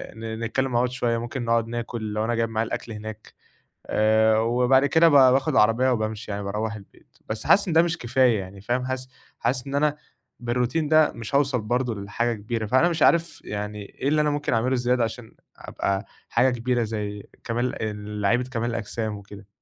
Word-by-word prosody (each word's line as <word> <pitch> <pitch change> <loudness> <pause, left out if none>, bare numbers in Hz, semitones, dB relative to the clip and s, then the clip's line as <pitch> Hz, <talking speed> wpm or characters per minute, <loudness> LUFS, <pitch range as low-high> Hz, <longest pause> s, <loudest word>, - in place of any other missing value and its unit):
ن 110 0 -6
نتكلم 130 +3 -1
مع 120 - +2
بعض 125 +1 +1
شوية، 120 -2 -1
ممكن 120 +2 -4
نقعد 115 -1 +1
ناكل 115 -2 -4
لو 105 +1 -1
أنا 120 +1 0
جايب 115 0 0
معايا 110 0 -1
الأكل 115 - -5
هناك، 110 0 -8 0.5
آآ 110 0 +3
وبعد 125 +4 +3
كده 160 +4 +5
ب - - 0
باخد 130 -1 +5
العربية 115 +4 +4
وبامشي 110 -2 -2
يعني 100 0 -4
باروّح 105 +2 -3
البيت. 100 -2 -16
بس 110 0 -4
حاسس 200 - +5
إن 170 - -1
ده 165 - +6
مش 175 0 -1
كفاية 120 -2 +2
يعني 95 +1 -9
فاهم؟ 125 +4 -1
حاسس 130 0 -4 0.3
حاسس 125 +3 -1
إن 135 - -4
أنا 150 +1 +2 0.5
بالRoutine 120 +1 0 0.2
ده 155 -1 +5
مش 115 +3 -5
هاوصَل 135 -4 +2
برضه 120 +2 -1
ل 100 - -6
لحاجة 115 +3 -1
كبيرة. 110 +1 -4
فأنا 130 +10 +3
مش 170 -1 -3
عارف 170 0 +2
يعني 105 0 -5
إيه 115 - -6
اللي 150 +1 +3
أنا 150 - +2
ممكن 145 -2 -1
أعمله 120 +3 +1
زيادة، 125 0 +1
عشان 115 0 -6 0.2
أبقى 100 +1 -3 0.2
حاجة 125 +3 +3
كبيرة 120 0 0
زي 105 -2 -4 0.2
كمال 120 +1 -2
ال 105 -1 -5
لعيبة 115 +5 +2
كمال 120 -1 -1
الأجسام 110 -1 -3
وكده. 100 0 -12
115 Hz, 200 wpm, -24 LUFS, 110-130 Hz, 0.5 s, ده